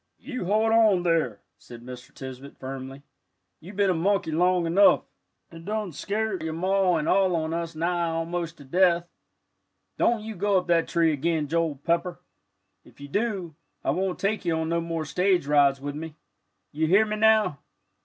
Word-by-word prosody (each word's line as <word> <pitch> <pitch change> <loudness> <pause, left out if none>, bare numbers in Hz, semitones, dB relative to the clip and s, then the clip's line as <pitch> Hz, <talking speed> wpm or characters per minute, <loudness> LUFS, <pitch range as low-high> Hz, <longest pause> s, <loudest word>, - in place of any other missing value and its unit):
"You 255 -10 -6
hold 215 +4 +2
on 215 -5 +4
there," 165 - 0 0.2
said 120 -1 -12
Mr. 125 0 -10
Tisbett, 130 +1 -10
firmly; 135 +1 -8 0.6
"you've 185 +5 -12
been 195 -2 +2
monkey 195 -2 +1
long 180 +2 +2
enough, 185 +5 +5 0.5
and 165 0 -11 0.3
scart 205 +3 -2
your 160 0 -3
Ma 185 +1 +1
and 155 -2 -1
all 190 -2 +3
on 160 0 -2
us 165 -1 -4
nigh 170 +1 0
almost 165 0 -3
to 145 - -13
death. 175 +3 +2 0.9
Don't 230 -2 +2
you 220 0 -6
go 200 +1 +1
up 180 - 0
that 170 -2 +2
tree 165 -2 +2
again, 155 +1 -1
Joel 165 -1 0
Pepper! 170 +5 -1 0.6
If - - -21
you 145 0 -10
do, 200 -3 -2 0.3
I - - +1
won't 190 0 -1
take 210 +2 -1
you 170 -2 0
on 160 0 -2
no 170 0 0
more 165 -1 -3
stage 180 +3 +1
rides 140 -2 +3
with 145 +1 -5
me. 155 +1 -7 0.6
You 160 +2 0
hear 195 +6 +5
me, 215 0 -3
now." 215 - +3
170 Hz, 175 wpm, -26 LUFS, 155-190 Hz, 0.9 s, enough